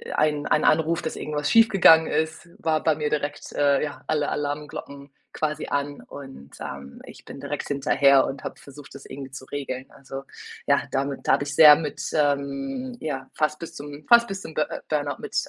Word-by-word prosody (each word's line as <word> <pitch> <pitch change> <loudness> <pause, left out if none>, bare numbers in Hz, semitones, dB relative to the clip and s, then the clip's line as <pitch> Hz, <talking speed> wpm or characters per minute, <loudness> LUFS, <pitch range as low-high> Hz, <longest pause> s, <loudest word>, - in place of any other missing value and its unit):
ein 150 -1 +1
ein - - +2
Anruf, 160 +2 +2
dass 160 - -4
irgendwas 150 -1 -2
schief 225 0 +6
gegangen 165 -5 +6
ist, 160 +2 -2
war 160 -1 0
bei 160 - +3
mir 150 -1 -2
direkt, 145 -1 -3
äh, 140 -1 +2
ja, 145 -1 -6
alle 150 -2 0
Alarmglocken 145 -1 -5 0.2
quasi 155 -1 -2
an. 145 0 -2
Und, 135 - -11
ähm, 70 0 -8
ich - - -13
bin - - -10
direkt - - -4
hinterher 140 -1 +4
und 135 - -6
habe - - -6
versucht, 140 0 -13
das 140 - -11
irgendwie 135 -1 -9
zu 130 0 -9
regeln. 130 -2 -5
Also, 135 0 -9 0.4
ja, - - +4
damit 140 0 -2
da - - +5
habe - - +2
ich 140 - -5
sehr 150 -1 +10
mit, 150 -3 -5
ähm 155 - -1
ja, 135 -4 -4
fast 155 0 0
bis 165 -1 -7
zum 145 +1 -9
fast 235 0 +7
bis 195 -2 -5
zum 160 - -9
Bur 155 - +1 0.2
Burnout 145 -2 -1
mit, - - -8
145 Hz, 195 wpm, -24 LUFS, 140-155 Hz, 0.4 s, sehr